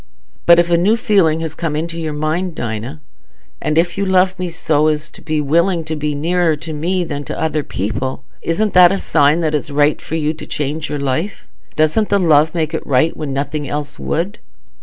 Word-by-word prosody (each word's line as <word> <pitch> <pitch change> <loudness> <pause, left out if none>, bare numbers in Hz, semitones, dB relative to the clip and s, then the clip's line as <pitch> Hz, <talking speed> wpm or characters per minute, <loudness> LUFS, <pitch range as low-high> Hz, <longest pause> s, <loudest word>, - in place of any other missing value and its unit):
"But 170 0 +8
if 170 0 +2
a 170 - +4
new 210 +6 +3
feeling 190 -9 +2
has 160 -2 -4
come 160 -2 -3
into 165 +2 -3
your 160 -1 -3
mind, 155 +4 -2
Dinah, 115 +5 -5 0.6
and 155 +1 -1
if 175 +3 +1
you - - +1
love 185 0 +2
me 180 -1 -2
so 155 -2 +1
as 155 0 -1
to - - -13
be 155 -1 -1
willing 170 +4 +2
to 160 0 -4
be 150 -1 -2
nearer 165 +2 +1
to 160 +1 -7
me 175 +5 -1
than 145 -4 -4
to - - -5
other 155 -1 0
people, 130 +4 -4 0.2
isn't 205 +6 0
that 180 -1 +7
a 195 - 0
sign 150 -2 +2
that 155 -2 0
it's 150 0 -1
right 145 +1 +2
for 160 - -5
you 155 -1 0
to 160 - -10
change 150 +2 -3
your 145 - -2
life? 140 +8 -3 0.3
Doesn't 155 +8 +2
the 200 - +3
love 160 -3 +3
make 160 -2 -1
it - - -4
right 140 +5 +2
when 150 -3 -4
nothing 140 +1 -3
else 145 0 -4
would?" 185 +7 -2
155 Hz, 215 wpm, -17 LUFS, 150-175 Hz, 0.6 s, But